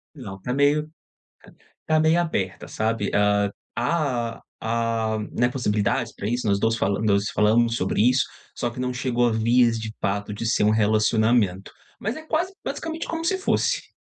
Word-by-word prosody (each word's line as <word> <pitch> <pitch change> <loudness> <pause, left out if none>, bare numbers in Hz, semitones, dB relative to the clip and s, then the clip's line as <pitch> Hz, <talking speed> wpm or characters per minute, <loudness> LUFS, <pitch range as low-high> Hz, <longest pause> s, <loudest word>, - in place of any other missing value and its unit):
Não, 100 -8 -9
tá 125 - -3
meio 145 +2 +3 1.0
tá 155 - +1
tá 155 - +5
meio 160 +2 +4
aberta, 100 - -2
sabe. 110 -1 -1
Hã, 100 0 +3 0.3
há 125 -3 -1 0.2
há, 115 -1 -1
né, 120 0 +2
possibilidades 115 -1 0
para 100 - -4
isso. 120 -1 -1
Nós 100 -1 +2
2 115 0 +2
falan 100 -2 0
nós 100 0 +2
falamos 115 +2 +3
sobre 95 +3 0
isso, 130 +1 +3 0.3
só 120 - -2
que 120 - -11
não 125 0 -1
chegou 125 -1 0
a - - 0
vias 115 +1 +3
de 110 0 -5
fato 100 +1 -2
de 115 - -5
ser 110 - +2
um 105 - +4
relacionamento, 110 -2 +2 0.3
mas 220 +4 -2
é 315 - -8
quase 320 +4 -1
basicamente, 325 0 -4
como 330 0 -4
se 375 +2 +1
fosse. 380 - 0
115 Hz, 175 wpm, -24 LUFS, 105-130 Hz, 1.0 s, tá